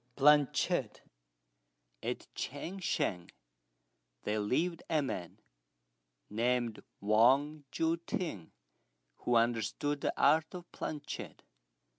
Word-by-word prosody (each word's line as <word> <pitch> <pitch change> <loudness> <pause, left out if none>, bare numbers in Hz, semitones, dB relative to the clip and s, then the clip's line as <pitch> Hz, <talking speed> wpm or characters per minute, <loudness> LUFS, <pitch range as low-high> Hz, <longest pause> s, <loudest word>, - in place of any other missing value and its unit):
PLANCHETTE. 145 0 +3 1.0
At - - -3
Ch'ang 170 +8 -5
shan 90 - -1 0.9
there 105 +1 0
lived 160 +11 0
a 155 -3 +2
man, 90 -10 -5 0.9
named 120 +1 0 0.2
Wang 135 +8 +3
Jui 165 +1 +1
t'ing, 130 - -3 0.7
who 120 - 0
understood 120 +5 +1
the - - -1
art 155 +4 +4
of 175 -1 -9
planchette. 150 -2 -6
140 Hz, 90 wpm, -33 LUFS, 115-155 Hz, 1.0 s, art